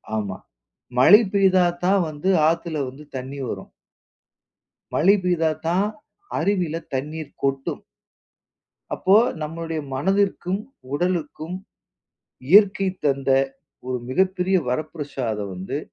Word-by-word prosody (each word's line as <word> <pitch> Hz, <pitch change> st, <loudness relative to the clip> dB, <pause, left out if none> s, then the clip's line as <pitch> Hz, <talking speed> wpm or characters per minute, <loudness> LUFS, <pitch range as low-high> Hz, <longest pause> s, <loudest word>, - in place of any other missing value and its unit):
ஆமா. 100 Hz, -3 st, -3 dB, 0.6 s
மழை 190 Hz, -, +8 dB
பெய்தாத்தான் 185 Hz, -1 st, +3 dB
வந்து 155 Hz, +5 st, -3 dB, 0.2 s
ஆத்துல 165 Hz, -2 st, -2 dB
வந்து 140 Hz, +4 st, -12 dB
தண்ணி 135 Hz, +2 st, -6 dB
வரும். -, -, -6 dB, 1.2 s
மழை 195 Hz, +6 st, +5 dB
பெய்தாத்தான் 170 Hz, +2 st, +1 dB, 0.5 s
அருவில 180 Hz, -5 st, 0 dB
தண்ணீர் 150 Hz, +3 st, -4 dB
கொட்டும். 135 Hz, 0 st, -1 dB, 1.1 s
அப்போ 190 Hz, +2 st, +3 dB, 0.3 s
நம்மளுடைய 165 Hz, +1 st, -4 dB
மனதிற்கும், 190 Hz, +4 st, 0 dB, 0.3 s
உடலுக்கும் 170 Hz, 0 st, -2 dB, 0.9 s
இயற்கை 195 Hz, 0 st, +6 dB, 0.2 s
தந்த 135 Hz, -1 st, +1 dB, 0.6 s
ஒரு 130 Hz, -1 st, -2 dB
மிகப்பெரிய 185 Hz, +5 st, +1 dB
வரப்பிரஷாதம் 125 Hz, -, -3 dB
வந்து 95 Hz, +10 st, -4 dB
165 Hz, 85 wpm, -23 LUFS, 140-185 Hz, 1.2 s, மழை